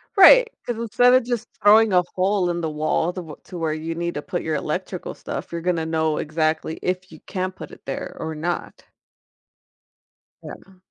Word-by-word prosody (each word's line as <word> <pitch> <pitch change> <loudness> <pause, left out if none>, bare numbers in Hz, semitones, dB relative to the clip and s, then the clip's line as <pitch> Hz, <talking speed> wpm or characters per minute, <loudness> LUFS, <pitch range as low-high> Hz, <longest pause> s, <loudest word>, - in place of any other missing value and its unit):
Right, 475 +5 +9 0.2
'cause 240 -2 -3
instead 235 +2 +3
of 255 - +4
just 240 -1 -2
throwing 215 +1 +6
a 180 - +6
hole 190 0 +1
in 175 0 -2
the 160 - -1
wall 155 +2 0
the 185 - -6
wh 155 -2 -12
to 180 - -8
where 160 -2 -1
you 160 +1 -4
need 170 +1 -3
to 145 - -4
put 175 - -3
your 160 -1 -2
electrical 140 - -4
stuff, - - -6
you're 170 - -3
gonna 170 -2 0
know 160 -1 0
exactly 155 +1 -1
if 185 0 -2
you 160 - -12
can 185 -1 -3
put 185 - -10
it - - -14
there 135 - -5
or 160 0 -4
not. 170 +3 -4 1.6
Yeah. 190 -1 -11
175 Hz, 195 wpm, -23 LUFS, 160-200 Hz, 1.6 s, Right